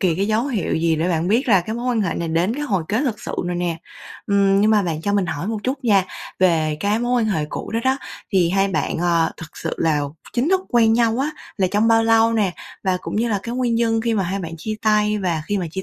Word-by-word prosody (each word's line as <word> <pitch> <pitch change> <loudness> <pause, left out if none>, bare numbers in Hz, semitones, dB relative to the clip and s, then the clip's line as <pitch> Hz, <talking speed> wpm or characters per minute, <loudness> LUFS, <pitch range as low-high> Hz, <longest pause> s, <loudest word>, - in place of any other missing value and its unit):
kỳ 180 -4 +2
cái 195 +4 0
dấu 220 +4 +1
hiệu 235 -9 -1
gì 165 0 +1
để 165 +3 0
bạn 170 0 0
biết 235 +7 +2
rằng 200 -7 +4
cái 220 - -3
mối 240 +1 -4
quan 245 -3 +1
hệ 185 -5 -1
này 170 - -3
đến 170 +7 +1
cái 295 - -4
hồi 195 - 0
kết 215 +4 +1
thực 230 -7 -2
sự - - -6
rồi 175 0 -2
nè. 175 -2 -1 0.5
Ừm, 200 -1 +3
nhưng 215 +1 +4
mà 210 -2 +4
bạn 165 -4 -3
cho 205 - 0
mình 200 -3 +1
hỏi 155 +1 -4
một 220 0 -2
chút 260 +3 -3
nha, 200 -5 +4 0.3
về 160 -4 +2
cái 205 +2 +1
mối 240 0 +1
quan - - 0
hệ 160 -7 0
cũ - - -6
đó 230 - +1
đó, 260 +1 +3 0.4
thì 180 -3 +3
hai 195 +1 +2
bạn, 165 -3 -1
ờ, 170 -1 +2
thực 160 -2 -11
sự 165 - -4
là 155 -2 +1 0.3
chính 250 +5 0
thức 380 0 +3
quen 230 -2 +4
nhau 230 0 +2
á 280 +3 0 0.3
là 190 - +2
trong 210 +2 +2
bao 225 0 +4
lâu 225 0 +4
nè? 205 -5 +1 0.3
Và 185 -1 +2
cũng - - -5
như 235 +2 +1
là 210 -3 0
cái 235 - -5
nguyên 245 -2 0
nhân 225 -1 +1
khi 230 0 0
mà 200 - +1
hai 190 +2 -2
bạn 165 -4 -6
chia 215 +7 -4
tay, 210 -1 +2
và 170 -5 -1
khi 205 +2 -1
mà 180 - -2
chia 190 +4 -5
205 Hz, 280 wpm, -21 LUFS, 175-225 Hz, 0.5 s, rằng